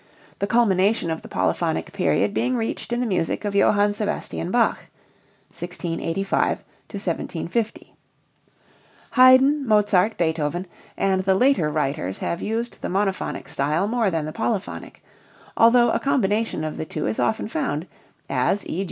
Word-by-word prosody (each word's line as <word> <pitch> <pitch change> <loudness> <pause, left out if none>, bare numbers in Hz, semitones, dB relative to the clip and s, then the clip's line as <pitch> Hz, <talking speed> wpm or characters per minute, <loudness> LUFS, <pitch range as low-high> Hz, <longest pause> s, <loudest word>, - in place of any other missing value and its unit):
the 200 - -1
culmination 205 -5 +2
of 160 - -3
the - - -11
polyphonic 165 +1 -1
period 200 +1 +1
being 250 +4 0
reached 225 +1 -3
in 240 - 0
the 250 - 0
music 185 -1 -1
of 205 - -2
Johann 205 +1 +3
Sebastian 205 - -3
Bach - - +1 0.7
(1685 175 +2 -2 0.3
1750). 195 +3 -3 1.2
Haydn, 260 +3 +6
Mozart, 210 -1 +3
Beethoven, 160 +1 -1 0.3
and 190 -1 +1
the 190 0 +3
later 250 - +3
writers 140 - -2
have 170 - -3
used 230 +2 -3
the - - -3
monophonic 195 +1 -2
style 150 +8 0
more 230 -2 +1
than 165 -4 -2
the 155 - -4
polyphonic, 205 -5 -4 0.5
although 240 +1 +5
a - - +1
combination 225 - 0
of 155 -1 -4
the - - -4
two - - -4
is 110 - -2
often 170 - 0
found, 225 - -2 0.4
as 135 +9 0
_e. 170 - -4
195 Hz, 140 wpm, -23 LUFS, 165-225 Hz, 1.2 s, Haydn